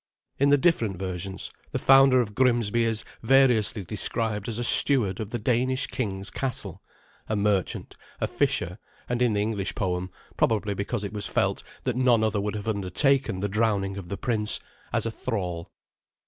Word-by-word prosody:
In 140 +1 +4
the 145 - +6
different 120 - +1
versions, 95 +1 -5 0.2
the - - +1
founder 135 -1 +6
of 105 -3 -4
Grimsby 120 -2 +2
is 110 -2 0 0.2
variously 115 -5 +3
described 110 +2 -3
as 115 - -2
a 120 - -2
steward 120 -7 +4
of 110 -2 -4
the 120 - -3
Danish 125 +3 0
king's 100 -5 -4
castle, 130 -3 -4 0.5
a 110 - 0
merchant, 100 -3 -1 0.2
a - - 0
fisher, 90 +4 -1 0.3
and 120 0 -2
in 120 -3 +3
the 105 - +1
English 105 -2 -2
poem 90 -1 -2 0.3
probably 105 -2 +1
because 100 +3 -3
it 100 - -5
was 105 -1 -3
felt - - 0 0.2
that 125 -2 -1
none 125 -3 +3
other 110 -2 0
would 105 +1 -3
have 105 0 -6
undertaken 110 - +1
the 100 - 0
drowning 100 -2 0
of 95 -3 -8
the 100 - -4
prince 110 -3 +1 0.3
as - - 0
a 115 - -1
thrall. 90 -9 -4
110 Hz, 175 wpm, -26 LUFS, 100-120 Hz, 0.5 s, the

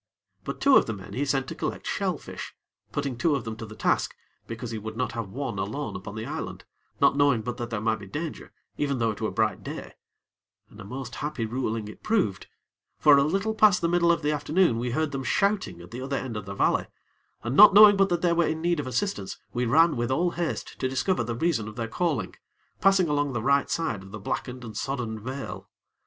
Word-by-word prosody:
But - - -5
two 275 -1 +6
of - - +3
the 110 - -2
men 95 -2 -10
he 140 +3 -1
sent 135 -1 0
to - - -4
collect - - -4
shell - - -1
fish - - -9 0.4
putting 140 -3 -2
two 145 +5 +2
of 135 - -3
them 110 0 -5
to 115 - -7
the 110 - -10
task, - - 0 0.3
because 115 +1 -6
he 110 - -3
would 110 +1 -7
not 125 - -1
have 115 -4 -4
one 125 -2 -4
alone 110 +10 -3
upon 95 +3 -7
the 110 - -4
island, - - -6 0.3
not - - +4
knowing 140 -6 +3
but 120 +1 -4
that 120 -2 -4
there 115 -3 -2
might 110 0 0
be 100 - -10
danger, 155 - -5 0.3
even 140 -2 0
though 115 -2 +1
it 105 - -9
were - - 0
bright - - 0
day; - - -7 0.8
and 105 - -12
a - - -8
most 125 +4 -7
happy 145 -6 -3
ruling 110 -2 -2
it 105 - -11
proved; 195 - 0 0.5
for, 150 -1 +7
a - - +4
little 195 +8 0
past 215 -4 +5
the 170 - +1
middle 170 0 +3
of 170 - 0
the 150 - +2
afternoon, 150 -3 +2
we 125 +1 -2
heard 155 +5 0
them 135 -1 -3
shouting 195 - 0
at 85 - -13
the 125 - -6
other 135 +1 -2
end 125 -4 -4
of 105 -2 -5
the 100 - -5
valley, - - +2 0.6
and, 120 - -2
not 210 +5 +10
knowing 210 -1 +10
but 195 0 +3
that 175 -1 0
they 175 -1 +4
were 170 -1 +2
in 155 0 -1
need 170 0 +1
of 140 - -3
assistance, 130 - -2 0.2
we 125 0 0
ran 160 +5 +5
with 120 -1 -1
all 170 +7 +1
haste 170 -2 -4
to 130 - 0
discover 135 +5 0
the 115 0 -3
reason 135 -6 0
of 110 - -8
their 115 -1 -3
calling, 135 - -1 0.5
passing 195 -2 +4
along 145 -2 0
the 115 -3 -2
right 140 +2 +5
hand - - -9
side 160 -12 -1
of 95 - -12
the 105 +2 -8
blackened 125 +5 -4
and 110 - -9
sodden 125 -5 -3
vale. 130 +5 -6
130 Hz, 240 wpm, -26 LUFS, 115-160 Hz, 0.8 s, not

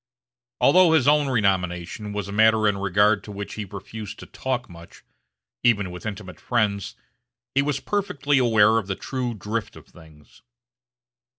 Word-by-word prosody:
Although 180 -3 +5
his 155 -5 +3
own 150 -1 +4
renomination 95 -3 -1
was 105 -1 -4
a - - -7
matter 110 +1 +4
in 100 -1 0
regard 100 +2 +2
to 105 - -9
which 100 0 -6
he 105 - -5
refused 105 +2 -8
to - - -10
talk 130 -1 -4
much, 85 -1 -14 0.6
even 105 -6 +2
with 90 +4 -7
intimate 90 -4 -7
friends, 105 -5 -1 0.6
he 140 - +3
was 140 -1 -1
perfectly 180 -9 0
aware 110 -2 +4
of 100 - -7
the 95 - -2
true 125 0 -4
drift 105 +2 -4
of - - -14
things. 80 -4 -19
105 Hz, 160 wpm, -24 LUFS, 100-125 Hz, 0.6 s, Although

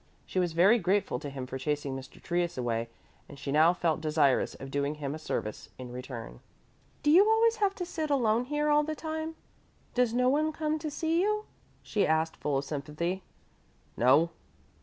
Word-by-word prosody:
She 185 - -2
was 175 -2 0
very 195 +8 +5
grateful 190 - +1
to 145 - -6
him 135 -2 -6
for 130 +1 -6
chasing 145 0 -2
Mr. 130 0 -9
Trius 175 -2 -1
away 115 -2 -1 0.4
and 145 - -11
she 140 0 -4
now 155 +4 +6
felt 165 -3 0
desirous 150 -4 +2
of 135 0 -9
doing 145 +1 -1
him 145 -2 -4
a 155 - -6
service 110 -8 -4
in 125 -1 -8
return. 120 - -7 0.6
"Do 295 - +4
you 360 +5 +8
always 450 +1 +4
have 400 -2 +1
to 360 - -4
sit 320 -3 -3
alone 240 -4 +2
here 295 +2 0
all 295 0 +5
the 310 +1 -3
time? 315 +1 -4 0.6
Does 250 -2 +2
no 250 +2 +2
one 305 +4 +2
come 310 0 -1
to 310 0 -3
see 325 +3 0
you?" 425 +2 0 0.4
she 210 - +1
asked, 160 +1 +1
full 145 -2 -1
of 140 - -2
sympathy. 155 +6 -3 0.7
"No." 145 +8 +4
170 Hz, 190 wpm, -29 LUFS, -, 0.7 s, you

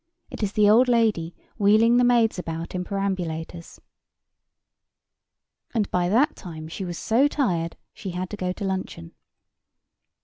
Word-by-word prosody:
It - - -7
is 205 -1 -1
the 210 -1 +4
old 230 +5 +6
lady 220 -9 +1 0.2
wheeling 220 +4 +5
the 245 - +4
maids 235 -5 +3
about 165 -1 -5
in 180 -1 -2
perambulators. 175 -4 -4 2.0
And 210 -3 0
by 180 0 +1
that 245 +9 +3
time 160 -4 -9
she 190 - -6
was 175 -2 -5
so 245 +6 +2
tired, 175 - -1 0.2
she 195 - -7
had 180 +1 -4
to - - -4
go 185 -2 -2
to 195 - -5
luncheon. 185 - -4
195 Hz, 145 wpm, -24 LUFS, 175-225 Hz, 2.0 s, old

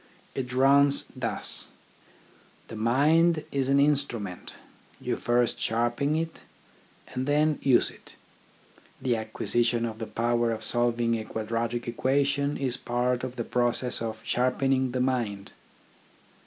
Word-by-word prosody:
It 125 -2 -4
runs 140 +2 +4
thus: - - -3 1.0
The - - -7
mind 150 +8 +3
is 135 -1 -1
an 140 0 +4
instrument, 140 -10 -1 0.4
you - - -2
first 120 0 +1
sharpen 120 +6 0
it, 165 0 -3 0.7
and 130 +1 -4
then 150 +1 +2
use 130 -3 +4
it; - - -15 0.8
the 130 -3 0
acquisition 115 +1 0
of 110 -1 -5
the 110 - -4
power 120 0 0
of 110 - -4
solving 120 -1 +1
a - - -5
quadratic 115 +2 -3
equation 140 +4 +1
is 130 -3 -1
part 125 +1 -1
of 130 -1 -5
the 120 - -3
process 120 +1 0
of 110 -1 -4
sharpening 130 +1 +1
the 125 0 -1
mind. 115 -6 -1
125 Hz, 130 wpm, -27 LUFS, 115-140 Hz, 1.0 s, runs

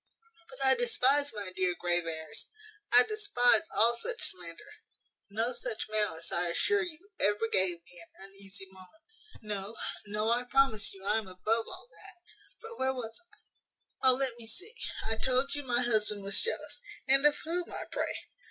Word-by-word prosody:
But 270 0 -4
I 265 - +6
despise, 260 +4 +3
my 205 -4 -5
dear 180 -1 +1
Graveairs, 165 -3 -2 0.4
I 245 +1 +8
despise 345 - +3
all 235 -2 +4
such - - 0
slander. 170 -2 -7 0.6
No 225 +5 -1
such 220 - -4
malice, 205 -7 -1
I 175 0 +1
assure 410 - +2
you, 355 +3 -7
ever 210 +2 +2
gave 185 -5 +3
me 175 0 -8
an 195 +1 -12
uneasy 195 0 -9
moment. 190 - -17 0.4
No, 205 0 -4 0.3
no, 210 +2 0
I 245 +1 +1
promise 245 -5 +3
you 195 0 -12
I 210 +2 +3
am 215 - -8
above 215 +5 0
all - - -7
that. - - -10 0.5
But 465 - -10
where 265 0 +1
was 225 -3 -5 0.9
I? - - +3
O 255 - +5
let 255 -3 -2
me 225 - -11
see, 370 - -7 0.3
I 225 0 -1
told 260 +4 +2
you 290 - -2
my 250 -2 0
husband 215 -3 +1
was 195 0 +1
jealous 465 +1 -2 0.3
And 270 0 +7
of 295 - +2
whom, 345 +2 -2
I - - -4
pray? - - -1
225 Hz, 170 wpm, -31 LUFS, 195-270 Hz, 0.9 s, I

